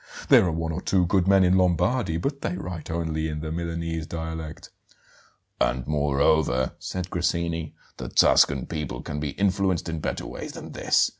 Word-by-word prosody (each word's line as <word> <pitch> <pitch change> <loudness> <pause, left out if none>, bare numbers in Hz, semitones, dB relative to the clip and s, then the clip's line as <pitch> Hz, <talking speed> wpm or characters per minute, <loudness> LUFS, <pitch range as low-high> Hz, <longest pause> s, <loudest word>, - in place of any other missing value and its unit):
There - - +7
are - - +1
one 80 0 -2
or 85 +3 -4
two 95 -2 +2
good 95 +1 +2
men 95 -1 +6
in 95 +1 +4
Lombardy, 90 +2 +1
but 140 - -3
they 90 - -2
write 90 -4 -6
only 80 -1 -2
in 75 -1 -4
the 80 0 -4
Milanese 85 -1 -3
dialect 80 -1 -6 0.4
" - - -25
"And 65 0 +1
moreover," 70 -2 +2
said 90 -1 -5
Grassini, 85 -2 -1 0.2
"the - - -6
Tuscan 70 -3 +4
people 75 -6 -5
can 75 - -4
be 75 -2 -3
influenced 95 -3 +1
in 80 -1 -3
better - - -3
ways - - -7
than - - -9
this. - - +2
80 Hz, 175 wpm, -25 LUFS, 80-90 Hz, 0.4 s, There